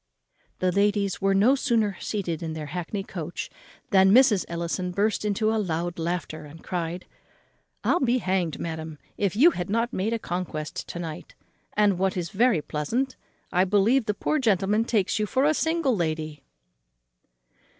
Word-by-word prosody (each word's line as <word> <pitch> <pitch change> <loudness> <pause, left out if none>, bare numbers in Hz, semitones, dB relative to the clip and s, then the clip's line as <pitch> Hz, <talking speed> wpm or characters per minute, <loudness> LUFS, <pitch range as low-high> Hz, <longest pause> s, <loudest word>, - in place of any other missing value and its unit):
The 185 0 +1
ladies 200 0 +1
were 195 0 +3
no 215 +7 +5
sooner 230 -7 +1
seated 180 -7 -3
in 160 -1 -4
their 155 -1 -5
hackney 180 +3 -3
coach 175 -3 -6 0.4
than 190 0 +6
Mrs. 235 -4 +5
Ellison 170 +2 -2
burst 205 +5 0
into 215 +1 +1
a 220 - +1
loud 170 -2 -2
laughter, 165 -2 -3
and 150 +2 -12
cried, 175 0 -3 0.8
"I'll 350 - +3
be 255 -1 +2
hanged, 185 -7 -1
madam, 160 -2 -5 0.2
if 200 -3 -1
you 305 +10 +7
have 180 - -4
not 230 +3 0
made 210 +5 -1
a - - +1
conquest 175 -6 -4
to - - -6
night; 165 -3 -7 0.4
and 205 -3 +3
what 190 0 +1
is 170 -2 -3
very 220 -6 +3
pleasant, 235 - -2 0.4
I 180 0 +3
believe 210 +6 +3
the 210 - 0
poor 310 - 0
gentleman 210 -2 +2
takes 205 -5 +1
you 210 - 0
for 260 +7 +1
a 305 - +4
single 320 -5 +1
lady." 155 -4 -2
195 Hz, 165 wpm, -26 LUFS, 170-220 Hz, 0.8 s, you